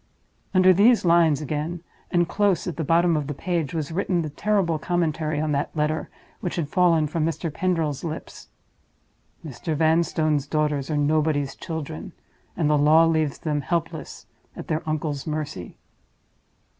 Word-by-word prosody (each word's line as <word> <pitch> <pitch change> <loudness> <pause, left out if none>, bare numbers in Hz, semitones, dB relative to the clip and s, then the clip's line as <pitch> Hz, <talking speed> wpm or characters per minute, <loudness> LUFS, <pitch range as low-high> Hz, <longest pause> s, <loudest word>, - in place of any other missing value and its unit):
Under 185 0 +6
these 215 +3 +4
lines 165 -3 +4
again, 155 +4 -3 0.3
and 175 -1 +2
close 200 0 +1
at 175 - -4
the 165 - -3
bottom 170 +2 +3
of 150 -2 -2
the 145 - -4
page, 170 -3 -2
was 155 -2 -3
written 180 0 0
the 155 - -5
terrible 185 -2 0
commentary 155 -2 -1
on 155 0 -1
that 145 0 0
letter 150 +1 -1 0.3
which 175 - -3
had 160 -5 -2
fallen 170 -2 +3
from 155 +1 -2
Mr. 165 0 -2
Pendril's 165 -6 -1
lips: 160 -2 -7 1.0
"Mr. 155 +3 -4
Vanstone's 155 -2 +1
daughters 150 -2 -1
are 150 - 0
Nobody's 145 -1 +1
Children, 160 - -6 0.4
and 155 - +1
the 150 -1 +3
law 155 +3 +6
leaves 160 -3 +1
them 150 -2 -2
helpless 165 +3 -4 0.3
at - - -8
their 155 0 0
uncle's 150 -2 -3
mercy." 150 - -5
155 Hz, 155 wpm, -24 LUFS, 150-170 Hz, 1.0 s, Under